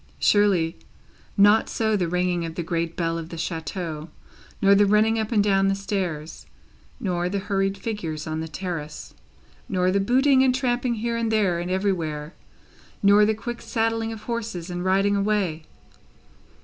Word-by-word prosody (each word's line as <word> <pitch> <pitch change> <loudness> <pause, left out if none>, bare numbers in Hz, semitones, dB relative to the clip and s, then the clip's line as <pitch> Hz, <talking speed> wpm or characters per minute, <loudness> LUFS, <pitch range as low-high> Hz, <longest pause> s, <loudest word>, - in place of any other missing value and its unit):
Surely, 190 -5 +3 0.6
not 205 +2 +5
so 220 -1 0
the 180 -4 0
ringing 180 0 0
of 165 -1 -5
the 170 - -3
great 170 0 -2
bell 165 -1 -1
of 165 0 -7
the 170 - -7
chateau, 165 -1 -4 0.5
nor 195 0 +5
the 200 0 +5
running 215 +2 +3
up 220 +1 -2
and 210 -3 +3
down 195 -1 +3
the 195 - +2
stairs; 185 -6 -4 0.5
nor 175 -2 -1
the 200 - -2
hurried 195 0 -1
figures 180 -8 -4
on 155 0 -3
the 160 - -4
terrace; 160 -3 -6 0.6
nor 185 0 +1
the 200 - +2
booting 260 +6 +4
and 260 -1 +3
tramping 245 -2 0
here 230 +1 -2
and 230 -1 -1
there 200 -6 +2
and 175 +1 -4
everywhere, 170 -5 -1 0.7
nor 205 +1 +6
the 220 - +1
quick 240 +2 -6
saddling 225 0 -1
of 220 -1 -8
horses 225 -7 -4
and 175 0 -3
riding 195 +2 +3
away? 195 -6 0
195 Hz, 165 wpm, -24 LUFS, 170-215 Hz, 0.7 s, nor